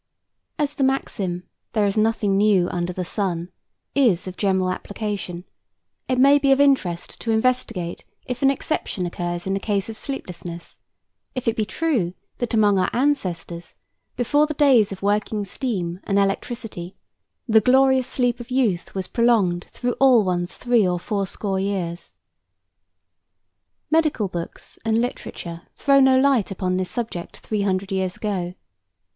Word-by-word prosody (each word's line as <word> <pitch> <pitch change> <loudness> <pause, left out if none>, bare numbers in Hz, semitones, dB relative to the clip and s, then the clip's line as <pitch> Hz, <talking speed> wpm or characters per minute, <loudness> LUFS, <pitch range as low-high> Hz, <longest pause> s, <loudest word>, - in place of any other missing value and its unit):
As 295 -2 0
the 275 - -1
maxim, 195 -9 -1 0.3
"There 215 -2 +2
is 200 - 0
nothing 215 -2 +2
new 200 -3 +4
under 175 0 -2
the 180 0 -4
sun," 180 -3 -2 0.4
is 225 -11 +3
of 185 - -6
general 190 -2 +1
application, 200 -3 -4 0.6
it 255 -1 0
may 280 +3 +6
be 275 -1 +3
of 270 - +5
interest 260 -12 +1
to 230 - -4
investigate 220 -7 0 0.2
if 250 -1 -4
an 270 - +5
exception 275 - -2
occurs 175 0 -3
in 195 - -1
the 195 - 0
case 205 +1 -1
of 220 - -7
sleeplessness; 175 -9 -6 0.6
if 255 - -4
it 230 - +2
be 215 - 0
true 220 - -1 0.2
that 240 -1 -1
among 205 -3 +4
our 185 - +2
ancestors, 185 - -1 0.4
before 290 +5 +2
the 305 - -4
days 265 -9 +5
of 195 0 -7
working 205 +1 0
steam 185 -6 -3
and 200 - +1
electricity, 200 -2 -2 0.5
the 220 -1 +5
glorious 260 +2 +4
sleep 245 -1 0
of 240 +1 -9
youth 235 -11 0
was 190 -1 -2
prolonged 210 -8 +2
through 245 -1 -2
all 255 -5 +6
one's 175 -1 -1
three 240 -5 +2
or 180 0 0
four 200 +2 -2
score 195 0 -2
years. 190 -3 -3 1.8
Medical 310 -10 +2
books 170 -2 -7
and 225 0 +2
literature 170 -8 -5
throw 275 -1 +4
no 265 -1 +6
light 265 -6 +3
upon 185 -1 -1
this 185 -1 -2
subject 225 -8 -4
three 215 -2 -3
hundred 195 -1 -1
years 190 -1 -1
ago. 185 -4 -3
205 Hz, 155 wpm, -23 LUFS, 185-250 Hz, 1.8 s, may